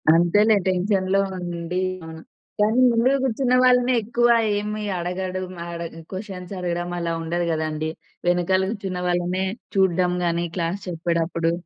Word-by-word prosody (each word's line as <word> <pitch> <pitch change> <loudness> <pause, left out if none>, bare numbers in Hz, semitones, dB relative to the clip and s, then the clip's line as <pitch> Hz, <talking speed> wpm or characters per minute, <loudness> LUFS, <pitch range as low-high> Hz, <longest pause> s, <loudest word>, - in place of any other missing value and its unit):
అంతేలే. 205 +6 +4
టెన్షన్‌లో 190 +1 +1 0.2
ఉండి. 175 0 -3 0.2
అవును. 160 0 -9 0.4
కానీ 215 +4 +3
ముందు 235 +3 +3
గూర్చున్న 255 0 +1
వాళ్ళనే 250 0 +4
ఎక్కువ 240 +2 +2 0.3
ఏమి 210 +1 -3 0.2
అడగడుం 185 +1 -3
అడగ 170 -1 -6
క్వెషన్స్ 190 -2 -7
అడగడం 175 -1 -2
అలా 170 -1 -1
ఉండదు 170 +1 -1
గదండీ! 155 0 -2 0.4
వెనకాల 180 +2 +2
కూర్చున్న 195 -4 -4
వాళ్ళనే 180 +1 0 0.3
చూడ్డం 185 -2 +3
గాని, 170 0 0
క్లాస్ 170 +3 -1
చెప్పేడప్పుడు. 170 -1 0
180 Hz, 125 wpm, -23 LUFS, 170-205 Hz, 0.4 s, అంతేలే